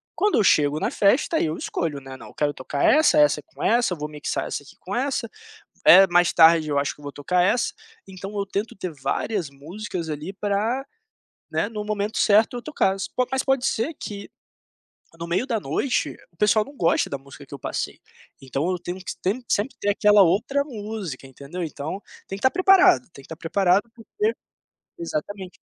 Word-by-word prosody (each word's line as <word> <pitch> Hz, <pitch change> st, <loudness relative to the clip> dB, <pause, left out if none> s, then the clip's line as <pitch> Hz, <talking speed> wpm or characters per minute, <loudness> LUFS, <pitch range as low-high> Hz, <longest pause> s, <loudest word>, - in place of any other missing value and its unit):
Quando 415 Hz, 0 st, +2 dB
eu 220 Hz, -, +4 dB
chego 150 Hz, -5 st, +3 dB
na -, -, -1 dB
festa 250 Hz, +10 st, +2 dB
aí -, -, +1 dB
eu 155 Hz, -, -3 dB
escolho, 155 Hz, -4 st, -3 dB
né, 135 Hz, -1 st, -10 dB
não, -, -, -12 dB
eu -, -, -14 dB
quero 145 Hz, -1 st, 0 dB
tocar 140 Hz, +2 st, -4 dB
essa, 310 Hz, +1 st, +5 dB
essa 295 Hz, 0 st, +4 dB
com 325 Hz, -, -15 dB
essa, 235 Hz, -5 st, +2 dB
vou 150 Hz, -2 st, -5 dB
mixar 150 Hz, -1 st, -4 dB
essa -, -, -4 dB
aqui 140 Hz, -, -17 dB
com 195 Hz, -, -6 dB
essa, 255 Hz, -2 st, -1 dB, 0.6 s
eh, 190 Hz, +3 st, +10 dB
mais 175 Hz, -1 st, +3 dB
tarde 160 Hz, -1 st, +6 dB
eu 145 Hz, -, 0 dB
acho 140 Hz, +1 st, 0 dB
que -, -, -19 dB
eu -, -, -16 dB
vou 145 Hz, -, -6 dB
tocar 175 Hz, +6 st, 0 dB
essa, 205 Hz, +7 st, +1 dB, 0.3 s
então 195 Hz, +2 st, -8 dB
eu 200 Hz, -, -1 dB
tento 200 Hz, +3 st, -4 dB
ter 185 Hz, -2 st, -5 dB
várias 150 Hz, +6 st, -2 dB
músicas 170 Hz, +5 st, -6 dB
ali 155 Hz, +5 st, -5 dB
pra, 210 Hz, +6 st, -1 dB, 0.7 s
né, -, -, 0 dB
no 215 Hz, -1 st, -5 dB
momento 210 Hz, 0 st, -2 dB
certo 215 Hz, +3 st, +4 dB
eu -, -, -6 dB
toca-las, 195 Hz, -9 st, -1 dB
po 255 Hz, -, 0 dB
mas 265 Hz, 0 st, 0 dB
pode 270 Hz, -2 st, +1 dB
ser 250 Hz, +8 st, 0 dB
que, 200 Hz, -5 st, -8 dB, 0.9 s
no 170 Hz, -, -4 dB
meio 185 Hz, +9 st, 0 dB
da 235 Hz, -4 st, 0 dB
noite, 195 Hz, -, -1 dB, 0.2 s
o -, -, -31 dB
pessoal 210 Hz, +2 st, +3 dB
não 280 Hz, +4 st, -14 dB
goste 170 Hz, -6 st, +2 dB
da 140 Hz, -, -3 dB
música 140 Hz, +1 st, -14 dB
que 140 Hz, -, -10 dB
eu -, -, -7 dB
passei, -, -, -4 dB, 0.4 s
então 135 Hz, +5 st, -2 dB
eu 180 Hz, -, -1 dB
tenho 180 Hz, +1 st, -6 dB
que 185 Hz, -2 st, -6 dB, 0.4 s
sempre 215 Hz, +6 st, 0 dB
ter 205 Hz, -, +1 dB
aquela 205 Hz, 0 st, +5 dB
outra 225 Hz, +11 st, +2 dB
música 210 Hz, -, -6 dB
entendeu, 140 Hz, +7 st, -8 dB
então 160 Hz, +4 st, -5 dB, 0.2 s
tem 195 Hz, -, -5 dB
que -, -, -11 dB
estar 260 Hz, -, +4 dB
preparado, 370 Hz, +1 st, +5 dB
tem 140 Hz, -, -13 dB
que -, -, -17 dB
estar 160 Hz, -, -8 dB
preparado 190 Hz, +6 st, +1 dB
porque 415 Hz, -, -2 dB, 0.6 s
exatamente. 205 Hz, -, -5 dB
195 Hz, 200 wpm, -24 LUFS, 155-230 Hz, 0.9 s, eh